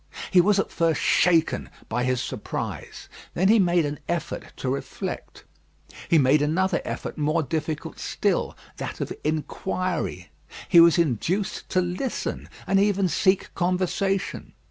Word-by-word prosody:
He 180 - +7
was 205 +3 +3
at 195 - 0
first 165 -2 +1
shaken 165 -3 +2 0.2
by 120 +2 -1
his 130 -1 +1
surprise; 130 -2 -5 0.3
then 190 +3 +3
he 225 +1 +6
made 175 -3 +3
an 145 0 -4
effort 170 -2 -3
to - - -4
reflect. 140 - -5 0.7
He 165 - +5
made 145 +1 +4
another 175 +5 +1
effort - - -5
more 155 +2 +1
difficult 155 +2 -4
still, - - -1 0.2
that - - -5
of - - -3
inquiry. 155 - -2 0.4
He 170 - +7
was 170 0 +7
induced 170 - -1
to 185 - +2
listen, 180 +9 -3 0.2
and 195 - +3
even 200 -2 +2
seek 190 +4 +1
conversation. 185 +2 -1
170 Hz, 140 wpm, -25 LUFS, 150-185 Hz, 0.7 s, He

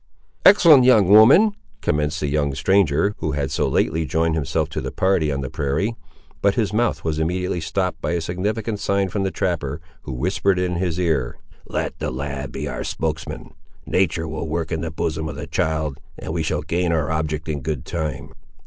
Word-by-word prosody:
"Excellent 160 -9 +8
young 115 -7 +5
woman," 130 - +7 0.3
commenced 75 +1 0
the 75 - 0
young 70 -1 0
stranger, 95 +4 +2
who 75 - -2
had 70 -2 -2
so - - 0
lately 80 +1 +1
joined 80 +3 0
himself 80 0 -1
to 80 - -4
the - - -4
party 90 -6 +1
on 70 -1 -2
the 65 - -4
prairie—but 75 +5 -2
his 105 -3 0
mouth 120 +2 0
was 80 -1 -1
immediately 90 +2 -1
stopped 90 +4 -2
by 75 - -1
a 85 - +1
significant 105 +6 -2
sign 100 -1 0
from 100 +2 -2
the 95 - 0
trapper, 80 -7 -2 0.2
who 70 - -7
whispered 95 +7 +1
in 90 -1 -1
his 90 -1 -1
ear— 80 -9 0 0.3
"Let - - -3
the - - -2
lad 70 0 -5
be - - -4
our - - -4
spokesman. 80 -1 -4 0.3
Natur' 80 -3 0
will 80 +1 -4
work 80 0 -2
in 80 -1 -1
the 80 - -3
bosom 80 0 -3
of 75 - -6
the 75 - -6
child, 80 -2 -1 0.2
and 80 - -5
we 85 - -1
shall 75 -1 -1
gain 85 +2 0
our 80 -1 0
object, 80 0 -2
in 75 -3 -3
good 70 -1 -3
time." 75 -4 -4
80 Hz, 195 wpm, -22 LUFS, 75-95 Hz, 0.3 s, Excellent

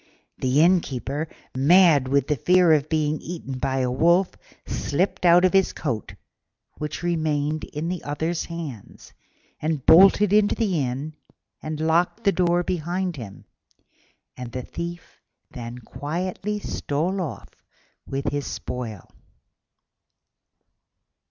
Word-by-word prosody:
The 130 +3 +2
Innkeeper, 155 -4 +1 0.3
mad 150 0 +5
with 140 0 +2
the 150 - 0
fear 180 +4 +4
of 150 -1 +1
being 155 -1 0
eaten 145 -6 -6
by 135 0 0
a 125 -1 0
wolf, 170 +7 +3 0.3
slipped 180 +4 -1
out 175 +2 +6
of 185 - +2
his 195 -1 +3
coat, 120 -9 -4 0.6
which 150 +2 -5
remained 155 -3 -1
in 155 +2 -5
the 180 -1 -4
other's 160 +3 -2
hands, 155 - -8 0.5
and 155 -3 -2
bolted 195 +3 +6
into 210 -1 +4
the 195 -8 0
inn 135 +5 -4 0.5
and 155 0 -5
locked 170 +7 +1
the 200 - +4
door 175 -1 +2
behind 180 +1 -2
him; 110 -8 -10 0.9
and 125 -2 -7
the 125 - -4
Thief 170 +3 -8 0.3
then 120 -1 -7
quietly 180 - -4
stole 180 0 -2
off 165 - -6 0.6
with 135 0 -2
his 145 -1 -3
spoil. 115 -7 -6
155 Hz, 125 wpm, -24 LUFS, 140-175 Hz, 0.9 s, out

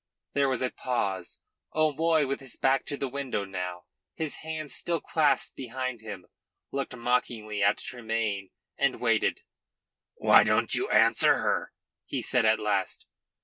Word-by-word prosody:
There 140 -1 +2
was 130 -1 0
a 125 - 0
pause. 100 -8 -3 0.3
O'Moy, 155 0 +3
with 135 +1 -2
his 135 -3 -8
back 135 0 +2
to 145 - -4
the 140 - -2
window 130 -6 -3
now, 90 -2 -5 0.3
his 160 -2 -3
hands 155 -2 -4
still 170 -1 0
clasped 155 -3 +1
behind 130 -1 -4
him, 100 -5 -8 0.5
looked 135 -2 -3
mockingly 120 -3 -1
at 100 +1 +4
Tremayne 110 -5 -3 0.3
and 140 -2 +1
waited. 115 -3 +1 0.7
"Why - - +6
don't - - +2
you - - +1
answer - - +5
her?" - - -1 0.4
he - - -3
said 125 -3 +2
at 110 0 +4
last. 100 -3 -1
125 Hz, 145 wpm, -28 LUFS, 105-140 Hz, 0.7 s, Why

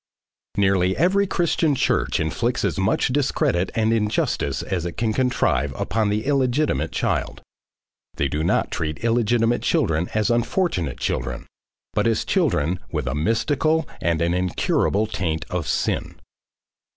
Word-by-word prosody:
Nearly 95 -2 +2
every 195 +4 +3
Christian 170 -4 +1
church - - +1
inflicts 115 +11 -1
as - - -1
much 95 +6 +1
discredit 125 - +1
and 110 0 +2
injustice 105 -2 0
as 90 -3 -2
it 85 -1 -4
can 110 -1 -1
contrive 75 - 0
upon 110 +3 0
the 105 +1 -1
illegitimate 140 +1 +1
child. - - -2 0.7
They 70 - 0
do 75 +4 -2
not 85 - +1
treat 80 +4 -3
illegitimate 115 0 +2
children 80 +2 +1
as 110 +2 +2
unfortunate 115 - 0
children, - - -2 0.5
but - - +1
as 115 - +1
children 90 - +1
with 75 -5 -2
a 65 - -2
mystical 140 - +1
and 85 0 +1
an 85 +1 +1
incurable 90 +3 +1
taint 85 -7 -2
of 90 -5 -2
SIN. - - -1
105 Hz, 140 wpm, -23 LUFS, 85-125 Hz, 0.7 s, every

